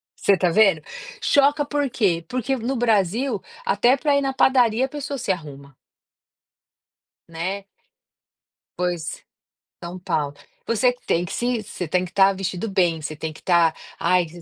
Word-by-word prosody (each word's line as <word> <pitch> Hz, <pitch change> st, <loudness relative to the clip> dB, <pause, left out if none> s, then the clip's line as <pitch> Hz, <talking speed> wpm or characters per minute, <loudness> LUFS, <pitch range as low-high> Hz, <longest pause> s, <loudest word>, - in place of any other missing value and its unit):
você 200 Hz, -, +3 dB
tá 180 Hz, -1 st, +2 dB
vendo, 190 Hz, -3 st, +4 dB, 0.4 s
choca 285 Hz, +1 st, +3 dB
por 290 Hz, -1 st, -1 dB
quê? 185 Hz, -8 st, +1 dB
Porque 255 Hz, +4 st, -1 dB
no 245 Hz, +4 st, -2 dB
Brasil, 225 Hz, 0 st, +1 dB, 0.2 s
até 240 Hz, +6 st, +3 dB
pra 290 Hz, 0 st, +1 dB
ir 280 Hz, -, +3 dB
na 270 Hz, -1 st, -1 dB
padaria 250 Hz, -2 st, +3 dB
a -, -, -7 dB
pessoa 285 Hz, 0 st, -5 dB
se 245 Hz, -5 st, -1 dB
arruma 140 Hz, -5 st, -7 dB, 1.5 s
Né? 185 Hz, +4 st, -4 dB, 1.1 s
Pois, 175 Hz, -3 st, -3 dB, 0.6 s
São 175 Hz, +1 st, -6 dB
Paulo. 145 Hz, -5 st, -2 dB, 0.3 s
Você 245 Hz, +2 st, +2 dB
tem 170 Hz, +1 st, +1 dB
que -, -, -7 dB
se 240 Hz, -2 st, -1 dB
você 185 Hz, -3 st, -6 dB
tem 180 Hz, +3 st, +1 dB
que 180 Hz, -, -12 dB
tá 195 Hz, 0 st, +5 dB
vestido 190 Hz, +2 st, -3 dB
bem, 175 Hz, -4 st, +1 dB
você 155 Hz, +1 st, -5 dB
tem 155 Hz, +1 st, -5 dB
que -, -, -15 dB
tá: 170 Hz, -3 st, +3 dB, 0.3 s
"Ai", 180 Hz, 0 st, +2 dB
195 Hz, 155 wpm, -23 LUFS, 170-250 Hz, 1.5 s, tá